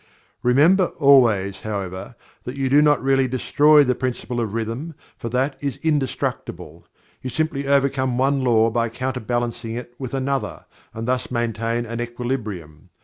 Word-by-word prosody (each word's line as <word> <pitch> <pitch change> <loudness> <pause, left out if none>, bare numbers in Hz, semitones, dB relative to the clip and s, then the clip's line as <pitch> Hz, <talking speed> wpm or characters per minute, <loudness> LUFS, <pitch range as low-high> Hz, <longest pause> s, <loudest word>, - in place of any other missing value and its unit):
Remember 155 +10 +4
always, 115 -9 +4
however, 100 0 -5 0.3
that 125 +3 -6
you 135 -1 0
do 145 +3 +5
not 145 -3 +3
really 135 -1 +3
destroy 145 +4 +4
the 125 -2 +1
Principle 125 -1 -3
of 110 -2 -3
Rhythm, 115 +8 -4 0.2
for 115 - -6
that 130 +3 -1
is 140 -3 -2
indestructible. 145 -5 -3 0.3
You 130 - -4
simply 140 +1 -2
overcome 135 -2 +1
one 135 +1 +1
law 115 -2 +3
by 115 0 0
counter 130 +2 -3
balancing 115 0 -3
it 120 0 -7
with 130 -1 -5
another 135 0 -2 0.3
and 115 +1 -6
thus 125 0 -1
maintain 115 -1 -1
an 115 +1 -4
equilibrium. 110 - -5
125 Hz, 150 wpm, -22 LUFS, 115-135 Hz, 0.3 s, do